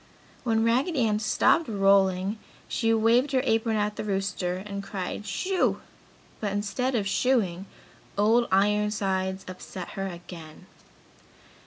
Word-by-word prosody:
When 225 -2 +1
Raggedy 255 +3 +2
Ann 210 -1 +1
stopped 220 +8 +2
rolling 195 -1 +2 0.3
she 225 - 0
waved 230 +5 +3
her 260 - +3
apron 225 -3 +1
at 210 0 -1
the - - -3
rooster 195 -3 -2
and 200 +1 -6
cried, 195 +1 -5
"Shoo!" 370 - 0 0.6
but 205 -2 -2
instead 215 +6 -1
of 205 -4 0
"shooing," 195 -6 +1 0.5
Old 225 +4 +3
Ironsides 195 -1 +1
upset 185 -1 -8
her 195 0 -4
again. 170 -2 -10
210 Hz, 125 wpm, -27 LUFS, 190-225 Hz, 0.6 s, waved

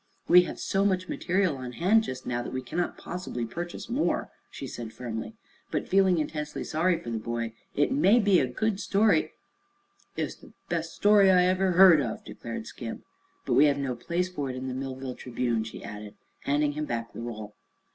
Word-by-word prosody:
"We 180 0 +7
have - - -7
so 195 0 0
much 185 -2 +1
material 180 -5 0
on 125 -1 -6
hand, 195 - +4
just 130 0 -6
now, 120 -1 -1
that - - -6
we 130 0 -3
cannot 175 +8 -2
possibly 175 -10 -5
purchase 175 - -6
more," 255 +6 0 0.2
she - - -7
said 120 -3 -7
firmly, 120 - -6 0.3
but - - -2
feeling 190 -2 +4
intensely 150 -1 -3
sorry 170 +3 +1
for 120 - -7
the 115 - -2
boy. 115 0 -3 0.2
"It 145 - +2
may 245 -5 +5
be 200 -5 +4
a 130 - +1
good 200 - -1
story 205 +1 +2 0.4
" 395 0 -37
"It's - - -2
the - - -17 0.2
bes' - - -2
story 205 -1 +5
I 180 -1 +6
ever 185 0 +2
heard 180 -4 +8
of!" 120 -5 -4
declared - - -7
Skim. - - -7 0.4
"But - - 0
we 145 - +6
have 145 -1 +3
no 135 -2 -2
place 170 +8 -1
for 145 -7 -4
it 130 - -4
in 130 +1 -5
the - - -3
Millville 130 0 -5
Tribune," 120 -2 -2
she 110 - -9
added, 105 0 -8 0.3
handing 145 +1 +2
him 150 +1 -3
back 115 -3 -4
the - - -7
roll. 110 -3 -6
150 Hz, 200 wpm, -28 LUFS, 125-185 Hz, 0.4 s, heard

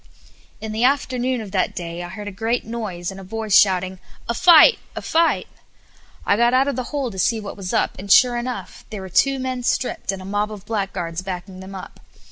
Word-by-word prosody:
In 220 - -6
the 220 +2 -1
afternoon 255 -2 +1
of 205 -3 -8
that 185 -2 0
day 170 0 -5
I 175 - -6
heard 210 -1 -8
a - - -4
great 225 +4 -2
noise, 205 -6 -4
and 195 - -10
a - - -9
voice 215 +1 -1
shouting, 185 -1 +3 0.3
"A 235 - 0
fight! 345 - +7 0.2
a - - -4
fight!" 330 +1 +2 0.8
I - - +3
got 235 +3 +3
out 265 +2 +3
of 280 - -1
the 255 0 -3
hole 275 -5 -2
to 190 - -7
see 225 +4 +2
what 205 -2 -7
was 190 -3 -5
up, - - 0
and 200 +1 -5
sure 245 +1 +6
enough 245 +1 -5
there 210 -3 -6
were 190 - -8
two 270 +9 +3
men 255 -1 -3
stripped, 245 -3 -1
and 195 - -6
a 185 - -9
mob 205 +2 -1
of 205 -2 -9
blackguards 185 -6 -3
backing 185 0 -7
them 190 +1 -9
up. 190 - -10
210 Hz, 225 wpm, -21 LUFS, 190-245 Hz, 0.8 s, fight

